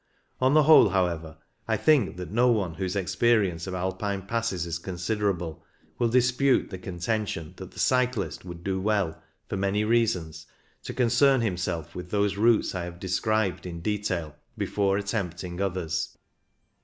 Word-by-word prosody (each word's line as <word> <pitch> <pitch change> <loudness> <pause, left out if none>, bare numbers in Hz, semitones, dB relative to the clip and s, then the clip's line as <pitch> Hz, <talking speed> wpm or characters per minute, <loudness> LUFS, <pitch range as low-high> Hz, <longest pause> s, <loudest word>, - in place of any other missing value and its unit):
On 130 +3 +3
the 155 - +6
whole, 155 -7 +7
however, 85 -4 -1 0.3
I - - +1
think 120 - +3
that 90 -2 -6
no 120 +4 +3
one 100 -8 +1
whose 95 +2 -3
experience 100 -3 +1
of 95 - -4
Alpine 95 +2 -2
passes 105 -4 -2
is 85 0 -3
considerable 90 -3 -2 0.4
will 120 - +3
dispute 125 +2 +2
the 95 - -6
contention 90 -2 -3
that - - -8
the - - -19
cyclist 125 -5 +1
would 85 -2 -9
do 95 0 -1
well, 100 -5 0 0.3
for 100 - -3
many 100 +2 +1
reasons, 105 -8 0 0.4
to - - -5
concern 130 +2 +4
himself 90 -6 -2
with 90 0 -7
those 100 0 +1
routes 110 +2 +3
I 90 -2 -3
have 85 0 -9
described 95 +1 0
in 85 -1 -6
detail 90 -6 -2 0.2
before 100 -1 +1
attempting 90 -3 -3
others. 90 -4 -2
95 Hz, 155 wpm, -27 LUFS, 90-110 Hz, 0.4 s, whole